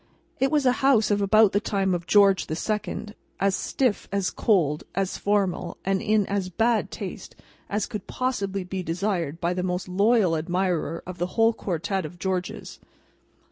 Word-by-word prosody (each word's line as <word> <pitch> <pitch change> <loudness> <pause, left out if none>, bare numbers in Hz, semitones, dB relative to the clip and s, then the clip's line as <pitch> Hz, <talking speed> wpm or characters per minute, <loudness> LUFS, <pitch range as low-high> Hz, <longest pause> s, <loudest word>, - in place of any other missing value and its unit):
It 270 +1 +3
was 295 -2 +1
a 250 - +6
house 245 -6 +4
of 205 0 +2
about 215 +1 +5
the 205 - +2
time 195 -3 0
of 170 -1 -3
George 200 -2 +4
the 155 - -3
Second; 210 +2 -3 0.3
as 195 -1 +2
stiff, 250 -6 -1
as 200 -2 0
cold, 160 -9 +1
as 195 0 -1
formal, 195 -4 0
and 195 0 +1
in 215 -2 +2
as 195 -2 -2
bad 225 +5 +1
taste, - - -7 0.3
as 205 0 0
could 210 -3 -7
possibly 200 -7 -2
be 185 +1 -4
desired 170 -3 -2
by 170 +1 0
the 180 - -2
most 180 0 -2
loyal 200 -1 +3
admirer 175 0 -1
of 185 -1 -8
the 175 - 0
whole 225 0 +5
quartet 190 0 -2
of 160 +3 -8
Georges. 185 -1 -4
195 Hz, 175 wpm, -25 LUFS, 180-215 Hz, 0.3 s, a